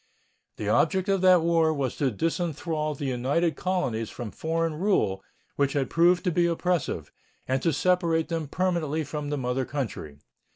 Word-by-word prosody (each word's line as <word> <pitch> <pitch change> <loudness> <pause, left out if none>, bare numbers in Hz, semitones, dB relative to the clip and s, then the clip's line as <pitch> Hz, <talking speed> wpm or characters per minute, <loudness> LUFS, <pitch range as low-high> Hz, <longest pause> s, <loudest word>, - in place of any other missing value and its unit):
The - - -4
object 190 0 +2
of 195 -2 +2
that 185 -3 +6
war 165 -1 +3
was 140 -5 -2
to 140 - +1
disenthrall 155 - -2
the 145 - -4
united 140 +6 0
colonies 130 - -1
from 115 -4 -7
foreign 165 0 -1
rule, 155 - 0 0.3
which 140 -1 +1
had 140 -3 -1
proved 175 +2 +4
to 180 - +1
be 170 +1 +2
oppressive, 170 -3 -1 0.4
and 130 0 0
to 165 - +2
separate 165 +1 +1
them 165 -2 -3
permanently 160 -2 -1
from 150 -1 -5
the 145 - -1
mother 130 0 -1
country. 120 - -5
160 Hz, 165 wpm, -26 LUFS, 135-175 Hz, 0.4 s, that